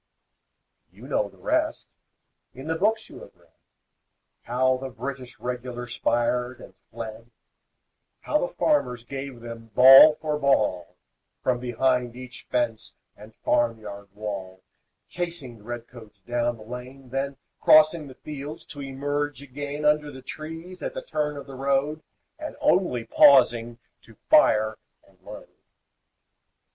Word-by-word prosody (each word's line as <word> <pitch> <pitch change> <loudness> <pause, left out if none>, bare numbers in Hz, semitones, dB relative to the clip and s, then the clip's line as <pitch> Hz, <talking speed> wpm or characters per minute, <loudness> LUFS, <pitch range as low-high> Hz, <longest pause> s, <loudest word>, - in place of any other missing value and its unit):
You - - -13
know - - 0
the - - -21
rest. - - -1 0.7
In 130 +2 -9
the 160 +1 -1
books 215 +5 +1
you - - -12
have - - -14
read, - - -28 0.9
How 130 +2 +1
the 135 +1 -6
British 130 0 -7
Regulars 125 0 -5
fired 125 +1 0
and - - -13 0.2
fled, 115 +1 -8 0.9
How - - +1
the - - 0
farmers 125 - +1
gave 135 -1 -7
them 115 -1 -9
ball 135 +4 +10
for 150 -1 -3
ball, 105 - +1 0.5
From 125 -1 +1
behind 125 0 0
each 125 -1 -11
fence 120 -3 -2 0.2
and 110 +1 -15
farm 120 -2 +2
yard 100 -1 -9
wall, 95 -3 -6 0.4
Chasing 165 -10 -5
the - - -18
red 120 +1 -6
coats 110 -5 -15
down 120 +1 -1
the 110 - -12
lane, 125 +3 -9
Then 135 +1 -3 0.2
crossing 155 0 +5
the 130 - -12
fields 150 +2 -8
to 145 - -8
emerge 145 +1 -3
again 145 +2 -5
Under 150 0 +3
the 130 -2 -11
trees 165 +4 -8
at - - -4
the - - -5
turn 150 - -2
of 140 - -8
the 135 - -11
road, 140 +3 0 0.4
And 310 0 -6
only 175 -11 +2
pausing 120 -2 +5 0.2
to 115 - -18 0.2
fire 110 - +5 0.3
and - - -26
load. - - -10
130 Hz, 140 wpm, -25 LUFS, 120-145 Hz, 0.9 s, ball